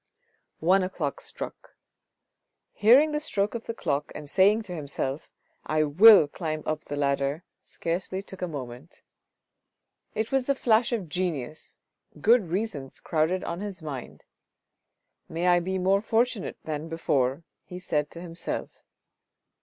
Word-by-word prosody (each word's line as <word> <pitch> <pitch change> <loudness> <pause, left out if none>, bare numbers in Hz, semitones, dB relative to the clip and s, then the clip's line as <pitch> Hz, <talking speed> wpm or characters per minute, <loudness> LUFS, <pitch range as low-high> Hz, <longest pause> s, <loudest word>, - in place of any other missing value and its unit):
One 185 +4 +4
o'clock 175 -6 -3
struck. - - -9 1.0
Hearing 255 +9 +6
the 300 - 0
stroke 210 -9 -1
of 235 -1 -5
the 230 - -4
clock 145 -6 -2
and 150 - -7
saying 200 +7 +4
to 185 -4 -7
himself, 140 -2 -3 0.2
" - - -41
I 155 - +4
will 185 +3 +8
climb 155 0 -4
up 155 -1 -3
the 145 - -5
ladder," 140 +2 0 0.2
scarcely 185 +3 -4
took 190 -1 -11
a 180 - -1
moment. 135 0 -8 1.1
It 220 +1 -2
was 270 -2 +1
the 280 - +2
flash 235 -2 +2
of 215 -7 -2
genius, 155 -4 -4 0.4
good 230 -4 +4
reasons 180 -8 -3
crowded 165 +3 0
on 170 +1 -4
his 200 -4 -6
mind. 130 - -7 0.5
" - - -56 0.2
May 170 +2 -1
I 175 0 +5
be 190 +2 -2
more 190 +2 +2
fortunate 225 0 0
than 155 +1 -4
before," 140 -3 0 0.2
he 180 - -9
said 150 -5 -1
to 170 - -10
himself. 170 -1 -5
175 Hz, 145 wpm, -27 LUFS, 150-205 Hz, 1.1 s, will